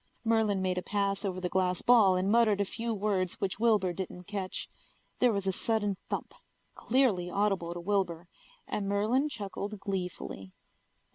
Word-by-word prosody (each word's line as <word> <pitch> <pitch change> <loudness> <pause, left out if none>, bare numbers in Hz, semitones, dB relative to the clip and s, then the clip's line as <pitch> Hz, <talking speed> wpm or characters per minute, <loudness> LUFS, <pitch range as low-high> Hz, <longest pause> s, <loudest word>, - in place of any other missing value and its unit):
Merlin 220 -4 +2
made 185 -1 0
a - - -5
pass 200 0 -1
over 185 -2 -2
the 180 - -1
glass 180 -1 0
ball 220 -6 +6
and 185 +2 +1
muttered 225 -3 +4
a 200 - +2
few 230 +4 -3
words 195 -4 0
which 195 0 -3
Wilbur 210 -6 +3
didn't 180 0 -6
catch. 195 -1 -4 0.5
There 250 -1 +5
was 200 -2 -1
a 190 - +2
sudden 205 0 0
thump, - - -3 0.4
clearly 225 -9 +1
audible 190 -3 0
to - - -4
Wilbur, 175 -2 -1 0.4
and 200 -1 -2
Merlin 225 +9 +2
chuckled 205 -3 -5
gleefully. 180 - -5
200 Hz, 160 wpm, -30 LUFS, 185-215 Hz, 0.5 s, ball